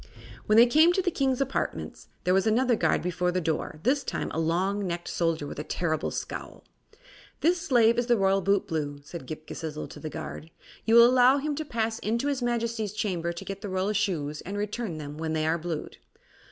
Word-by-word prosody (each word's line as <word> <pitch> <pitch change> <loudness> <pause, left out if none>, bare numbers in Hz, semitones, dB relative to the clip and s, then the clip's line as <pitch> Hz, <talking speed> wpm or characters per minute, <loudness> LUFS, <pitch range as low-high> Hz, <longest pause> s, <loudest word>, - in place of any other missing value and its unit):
When 215 - +4
they 235 - +9
came 310 +7 +5
to 380 - +1
the 355 - +1
King's 270 -3 0
apartments 270 0 -3 0.2
there 180 - +2
was 190 +3 +3
another 240 +2 +3
guard 160 -6 +1
before 180 0 0
the 185 - 0
door, 160 -2 -2
this 275 +3 +2
time - - -3
a - - -2
long 185 +5 0
necked 175 0 -4
soldier 165 -3 0
with 145 - -7
a - - -3
terrible 160 -1 -1
scowl. - - -6 0.8
"This 345 +2 +2
slave 235 -3 +4
is 240 - -1
the 240 -1 +4
Royal 195 0 +3
Bootblue," 160 -7 -1
said 155 -4 -8
Ghip 155 0 -7
Ghisizzle 155 -2 -6
to - - -10
the 155 - -5
guard. 160 +1 -7 0.4
"You 225 - +4
will 235 0 +10
allow 255 +2 +5
him 295 +2 -2
to 310 +2 -3
pass 230 -5 -2
into 235 +6 -1
his 275 -3 -1
Majesty's 230 -3 -1
chamber 175 -5 -1
to 170 - -8
get 195 0 -6
the 205 - -5
royal 190 +2 0
shoes 155 -8 -1
and 195 - -6
to - - -2
return 210 -4 -3
them 150 0 -7
when 160 -1 -2
they 155 0 0
are 165 +2 +1
blued." 165 -2 -5
195 Hz, 215 wpm, -27 LUFS, 165-240 Hz, 0.8 s, will